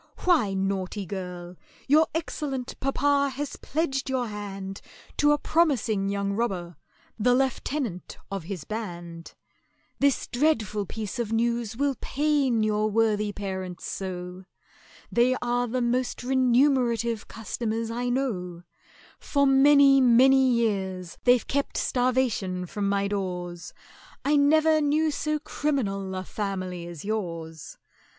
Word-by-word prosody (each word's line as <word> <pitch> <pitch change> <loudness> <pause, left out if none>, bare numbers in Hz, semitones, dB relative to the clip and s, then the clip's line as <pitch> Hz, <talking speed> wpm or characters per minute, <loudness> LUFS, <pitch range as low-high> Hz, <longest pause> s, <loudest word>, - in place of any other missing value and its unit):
Why, 310 - +3
naughty 195 +1 -2
girl, 180 -2 -6 0.3
your 310 +3 +5
excellent 275 -5 -3
papa 280 +1 +2
has 285 0 -4
pledged 280 -4 -2
your 260 -2 0
hand 195 -2 -6 0.4
To 295 0 +4
a 295 - +4
promising 255 -12 +1
young 200 0 -1
robber, 190 -6 -2 0.4
the 245 +3 +4
lieutenant 260 - -2
of 195 -4 -4
his 180 -4 -5
band! 175 -6 -7 0.6
"This 280 -1 +2
dreadful 225 - 0
piece 220 +2 -5
of 230 -2 -2
news 235 -1 0
will 280 0 +1
pain 280 -5 +1
your 215 0 +1
worthy 210 -1 +1
parents 190 -3 -5
so! 180 -1 -5 0.7
They 245 +2 +3
are 245 0 0
the 250 +1 -1
most 245 +1 -1
remunerative 250 -3 +2
customers 225 0 -3
I 245 +1 -2
know; 185 -10 -2 0.6
For 280 -1 +1
many 275 0 +6
many 260 +2 +6
years 190 -7 -1
they've 245 -1 +5
kept 280 0 -2
starvation 245 -8 0
from 200 +2 -2
my 200 0 +1
doors: 180 -3 -4 0.5
I 295 +2 +3
never 310 +2 +4
knew 305 +2 +2
so 305 +1 -1
criminal 215 -11 -2
a 185 - -3
family 185 -4 -4
as 170 -2 -9
yours! 165 -7 -5
230 Hz, 125 wpm, -26 LUFS, 195-270 Hz, 0.7 s, many